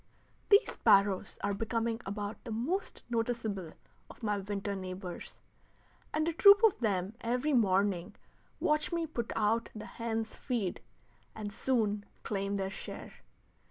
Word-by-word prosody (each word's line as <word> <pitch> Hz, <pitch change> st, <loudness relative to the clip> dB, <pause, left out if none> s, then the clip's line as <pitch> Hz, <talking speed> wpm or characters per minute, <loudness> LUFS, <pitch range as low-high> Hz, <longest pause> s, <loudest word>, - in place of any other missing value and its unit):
These 405 Hz, 0 st, +6 dB
sparrows 195 Hz, -1 st, +3 dB
are 200 Hz, -, +1 dB
becoming 225 Hz, +2 st, -1 dB
about 205 Hz, +1 st, -4 dB
the 240 Hz, -, -8 dB
most 285 Hz, -, -2 dB
noticeable 225 Hz, -7 st, -2 dB, 0.4 s
of -, -, -14 dB
my 210 Hz, -2 st, +1 dB
winter 200 Hz, 0 st, -3 dB
neighbors, 185 Hz, -1 st, -7 dB, 0.7 s
and 310 Hz, +1 st, 0 dB
a 335 Hz, -, +1 dB
troop 400 Hz, +5 st, +8 dB
of 445 Hz, -4 st, +5 dB
them 200 Hz, -4 st, 0 dB
every 250 Hz, +6 st, 0 dB
morning 195 Hz, -5 st, +2 dB, 0.4 s
watch 300 Hz, +3 st, +1 dB
me 335 Hz, -1 st, 0 dB
put 240 Hz, -7 st, -4 dB
out 225 Hz, +2 st, +1 dB
the 215 Hz, -, -6 dB
hens' 225 Hz, -1 st, -3 dB
feed, 230 Hz, -9 st, -2 dB, 0.5 s
and 210 Hz, -2 st, -5 dB
soon 210 Hz, -4 st, +1 dB, 0.2 s
claim 200 Hz, -1 st, -1 dB
their 190 Hz, 0 st, -2 dB
share. -, -, -8 dB
220 Hz, 135 wpm, -32 LUFS, 200-245 Hz, 0.7 s, troop